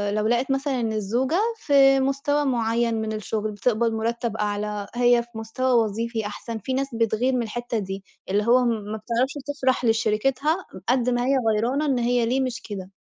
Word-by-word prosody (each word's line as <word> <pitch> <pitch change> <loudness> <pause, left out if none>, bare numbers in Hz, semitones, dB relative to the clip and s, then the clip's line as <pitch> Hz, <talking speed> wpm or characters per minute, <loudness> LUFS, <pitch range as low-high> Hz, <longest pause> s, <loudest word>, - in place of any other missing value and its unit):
لو 215 0 +1
لقت 240 +3 +1
مثلًا 270 -1 0
إن 225 -2 -1
الزوجة 240 - 0 0.2
في 275 -5 +5
مُستوى 275 +2 0
معَيَّن 235 -2 +1
من 220 0 -3
الشغل، 215 0 -3
بتِقبَض 225 +2 +1
مرَتّب 230 0 -2
أعلى، 210 -1 -2
هي 240 -1 +4
في 235 - -23
مُستوى 245 +4 -1
وظيفي 225 +1 -3
أحسن، 220 +2 -5
في 260 +6 -4
ناس 270 +1 0
بتغِير 230 +3 +1
من 250 -2 +1
الحتة 240 +1 -3
دي، 195 -1 -5 0.3
اللي 205 +2 +2
هو 250 +2 +5
م - - +3
ما 215 -1 -3
بتعرفش 235 +5 -1
تفرح 260 -3 0
لشريكِتها 255 - +1 0.2
قد 250 0 +2
ما 245 0 0
هي 270 +1 +3 0.2
غيرانة 250 +8 0
إن 265 -4 +1
هي 240 0 +2
ليه 255 +3 +1
مش 255 0 -3
كده. 190 -2 -6
235 Hz, 185 wpm, -24 LUFS, 220-260 Hz, 0.3 s, في